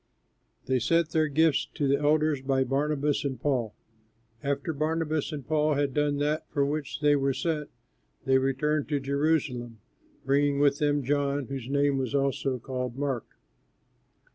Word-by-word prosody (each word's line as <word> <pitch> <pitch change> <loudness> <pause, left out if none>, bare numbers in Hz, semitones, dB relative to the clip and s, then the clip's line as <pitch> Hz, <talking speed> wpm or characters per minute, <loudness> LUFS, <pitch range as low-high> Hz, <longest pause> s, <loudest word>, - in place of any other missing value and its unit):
They 130 -1 +1
sent 165 +6 +1
their 155 -1 +2
gifts 155 0 +2
to 145 -3 0
the 140 +1 +2
elders 150 -1 +2
by 135 0 +1
Barnabas 145 +2 0
and 135 -4 -3
Paul. 125 -6 -1 0.7
After 140 +3 -2
Barnabas 155 0 -1
and 145 -4 -6
Paul 155 0 +2
had 140 -1 0
done 145 0 +1
that 150 +2 -1
for 140 -2 +1
which 145 0 -3
they 145 -1 +4
were 135 -1 +1
sent, 155 -3 -2 0.6
they 130 0 +4
returned 140 +3 0
from 145 -3 -1
Jerusalem, 135 -5 0 0.5
bringing 140 +1 +2
with 145 0 +3
them 145 -1 +1
John, 140 +1 0
who 140 +2 0
was 130 0 -2
also 135 -1 0
called 125 0 -5
Mark. 135 -5 -2
140 Hz, 150 wpm, -27 LUFS, 135-150 Hz, 0.7 s, they